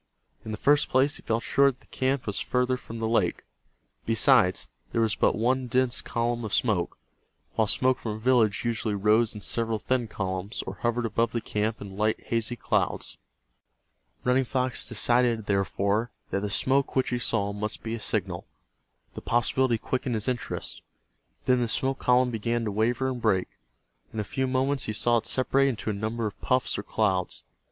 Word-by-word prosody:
In - - -8
the 105 - -3
first 145 +4 +3
place 135 +3 +2
he - - -13
felt 115 +1 -1
sure 140 0 +4
that 130 - -7
the - - -24
camp 130 0 -1
was 105 - -2
farther 125 0 +1
from 115 -2 -9
the 115 0 -1
lake. 110 -6 +1 0.6
Besides, 115 -4 +3 0.2
there - - 0
was 110 -2 +2
but - - +2
one 125 +3 +1
dense 125 0 +1
column 120 0 -1
of 110 - -1
smoke, 105 -8 0 0.6
while 110 - +2
smoke 130 +4 +2
from 110 - -3
a - - -5
village 115 -3 +2
usually 110 -2 -1
rose 105 +3 +3
in 105 - -7
several 115 +1 -1
thin 125 +1 -1
columns, 95 +1 -3
or - - -6
hovered 120 0 0
above 115 +1 0
the 120 - 0
camp 110 0 -2
in 100 -1 -9
light 110 +1 +1
hazy 115 +1 -2
clouds. - - -1 1.1
Running 125 +1 +3
Fox 130 0 -1
decided, 120 -1 +2
therefore, 100 +3 0 0.2
that - - +1
the 105 +1 -3
smoke 135 +6 +1
which 130 - +2
he 125 - 0
saw 100 -4 0
must 105 +1 -4
be 115 - -3
a 115 - -3
signal. 95 -5 -1 0.7
The - - -7
possibility 120 +1 +2
quickened 125 +1 -2
his 110 -1 -2
interest. 125 -2 -3 0.6
Then 125 -1 +3
the 120 - +1
smoke 135 +2 0
column 125 0 +3
began 115 +1 -1
to 105 - -1
waver 120 +5 +1
and 125 -2 -3
break. 95 -5 +2 0.6
In 110 - -5
a - - 0
few 130 +5 -2
moments 130 +1 0
he 110 - -3
saw 120 +2 +3
it 115 - -2
separate 135 +2 +2
into 115 -4 -2
a - - -2
number 110 +3 -2
of 105 - -5
puffs 130 -1 +1
or - - -2
clouds. 90 -1 -1
115 Hz, 190 wpm, -27 LUFS, 105-125 Hz, 1.1 s, sure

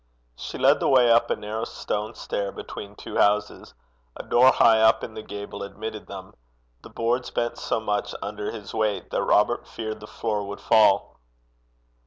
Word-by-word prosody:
She - - -7
led - - +4
the - - 0
way 125 -3 +5
up 115 - +4
a - - +1
narrow 110 +2 -5
stone 105 +2 -4
stair 100 -1 -3
between 100 0 -9
two - - -7
houses. 105 +1 +1 0.4
A - - -6
door 130 +2 +5
high 115 -2 +5
up 110 0 +4
in 110 - -6
the 110 - -7
gable 100 -1 -8
admitted 105 +2 -7
them. 95 -1 -9 0.5
The - - -13
boards 120 +2 -1
bent 120 0 -2
so - - -1
much 105 -2 -2
under 105 +1 -5
his 105 -3 -8
weight 110 -2 -1
that - - 0
Robert 105 +3 +2
feared 110 -1 -6
the 105 - -11
floor 105 -2 -3
would 100 0 -7
fall. 110 - +3
110 Hz, 180 wpm, -25 LUFS, 105-115 Hz, 0.5 s, way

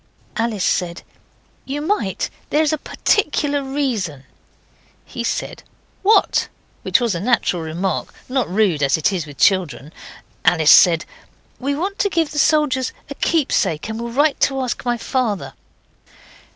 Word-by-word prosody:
Alice 225 -4 -1
said, 175 -1 -1 0.6
'You 280 +2 -4
might; 295 - -1 0.2
there's 305 0 +2
a 310 - -1
particular 290 -7 0
reason.' 240 - -2 0.8
He - - -6
said, - - -3 0.4
'What?' 420 +3 +3 0.3
which - - +2
was 235 -4 0
a 170 - -3
natural 200 -4 +1
remark; 170 +4 -3 0.2
not 260 -1 -1
rude, 185 -5 +1
as 140 0 +3
it 160 +5 +1
is 170 -4 -3
with 145 -2 -12
children. 165 -6 +1 0.5
Alice 160 -4 +5
said 170 -2 +6 0.5
'We 280 +2 -1
want 385 +7 -3
to 405 - +2
give 330 -4 0
the 295 - -2
soldiers 285 -4 +2 0.2
a - - -2
keepsake 265 - 0
and 220 +1 -4
will 235 - -4
write 290 +4 +2
to 270 -1 +1
ask 250 -2 -3
my 240 -1 0
father. 220 - -2
235 Hz, 145 wpm, -20 LUFS, 175-285 Hz, 0.8 s, said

